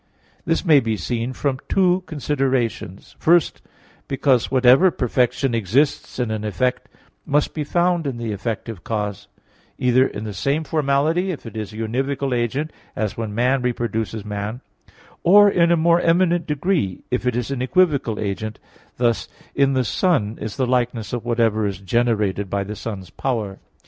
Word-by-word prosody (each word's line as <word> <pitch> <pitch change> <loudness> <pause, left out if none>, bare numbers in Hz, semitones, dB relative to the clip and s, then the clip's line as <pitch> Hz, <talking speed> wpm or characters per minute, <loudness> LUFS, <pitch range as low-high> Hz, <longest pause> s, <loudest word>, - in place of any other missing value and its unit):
This 165 +3 0
may 155 -4 +6
be 115 -4 -1
seen 115 +6 -2
from 130 0 -2
two 185 -1 +3
considerations. 130 - -2
First, 170 0 +3 0.5
because 130 -2 +2
whatever 130 +7 +5
perfection 125 -2 0
exists 120 +7 0
in 120 -3 -1
an 110 -1 -3
effect 125 +4 -1 0.3
must 145 +1 0
be 155 - -2
found 175 +1 +1
in 130 -3 -3
the 115 -2 -3
effective 105 -1 -4
cause: 105 -3 -3 0.5
either 125 +1 +3
in 105 - -7
the 105 -1 -5
same 140 - 0
formality, 155 +4 +1
if 165 -8 -5
it 115 - -9
is 110 -2 -5
a 110 - -10
univocal 135 +4 -1
agent 130 +6 -2 0.2
as 110 -2 -2
when 110 -2 -4
man 125 +3 +2
reproduces 115 -3 -2
man; 105 +4 -4 0.6
or 205 +3 +7
in 170 -2 +3
a 170 - +4
more 170 +1 +4
eminent 170 0 +2
degree, 150 - -1
if 125 0 -1
it 125 - +1
is 125 +2 -2
an 135 -2 -2
equivocal 140 - +2
agent 110 +1 -3 0.4
thus 120 -2 +1 0.3
in 140 -1 +2
the 130 -1 +1
sun 115 - +1
is 110 - -5
the 130 - +1
likeness 120 -4 -1
of 120 -2 -2
whatever 115 -3 +1
is 100 -2 -4
generated 105 -1 0
by 100 +1 -1
the 105 +2 -6
sun's 95 -6 -7
power. 110 -7 -3
125 Hz, 165 wpm, -21 LUFS, 110-145 Hz, 0.6 s, or